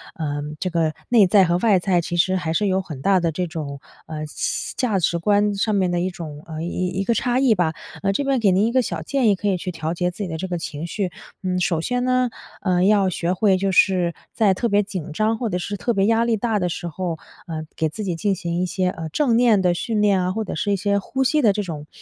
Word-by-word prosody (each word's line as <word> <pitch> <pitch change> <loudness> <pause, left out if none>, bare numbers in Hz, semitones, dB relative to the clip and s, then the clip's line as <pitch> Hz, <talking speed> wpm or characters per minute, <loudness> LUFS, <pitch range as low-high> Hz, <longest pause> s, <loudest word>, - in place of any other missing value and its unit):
呃， 145 -5 -3 0.2
这 185 - 0
个 165 -2 0 0.2
内 225 -5 +6
在 195 +1 +6
和 175 -1 +2
外 205 +1 +4
在 180 -1 +2
其 170 +1 -3
实 185 +2 +2
还 160 -3 -2
是 205 +4 +1
有 190 0 +1
很 155 -7 -8
大 195 +4 +3
的 170 -2 0
这 180 +3 -1
种， 150 -4 -6 0.3
呃， 155 -1 -5 0.5
价 255 - +1
价 190 - +3
值 170 0 +1
观 205 +4 +2
上 210 +2 0
面 190 -2 +2
的 175 - 0
一 185 +2 0
种 155 -4 -8
呃， 160 0 -5
一 180 +1 -2
一 - - +1
个 235 - +1
差 245 +3 0
异 260 -4 +4
吧。 170 -4 +1 0.4
这 280 - 0
边 275 -2 +1
给 205 -4 +3
您 190 +3 +3
一 235 - -1
个 255 - +3
小 - - -4
建 270 -5 +1
议， 205 - +5
可 205 - -3
以 190 - +2
去 180 +1 -4
调 160 -1 -3
节 180 +1 0
自 180 - -17
己 - - -3
的 160 - -4
这 190 +3 -4
个 175 - -2
情 160 0 -5
绪。 185 0 -3 0.3
嗯， 180 -1 0
首 170 -3 +1
先 245 +7 -1
呢， 255 -1 +2 0.3
呃， 180 -2 +2
要 200 -1 +4
学 175 +1 -1
会 190 0 +3
就 195 +1 0
是 180 -2 +3 0.2
在 205 -4 +3
特 235 +5 -1
别 205 0 +3
紧 180 -6 -6
张， 215 +5 +1
或 230 -2 -2
者 180 - -1
是 200 +3 -4
特 235 +5 -1
别 195 -2 +2
压 225 +2 +3
力 230 -2 +1
大 220 -1 0
的 180 - 0
时 175 +1 -4
候， 170 0 -3 0.3
呃， 160 -1 -4
给 160 - 0
自 190 +8 -6
己 180 -4 -2
进 195 +3 0
行 170 0 -2
一 - - +1
些， 185 +1 0
呃， 165 -3 -5
正 240 - +1
念 230 -5 +4
的 180 -1 +3
训 215 +4 -1
练 200 -3 +3
啊， 180 - 0
或 220 +3 -2
者 - - -5
是 205 - -1
一 - - +3
些 200 +1 +1
呼 265 +7 -2
吸 300 +4 +2
的 220 -6 +5
这 210 +1 -2
种， 150 -5 -7
185 Hz, 290 characters per minute, -22 LUFS, 170-210 Hz, 0.5 s, 内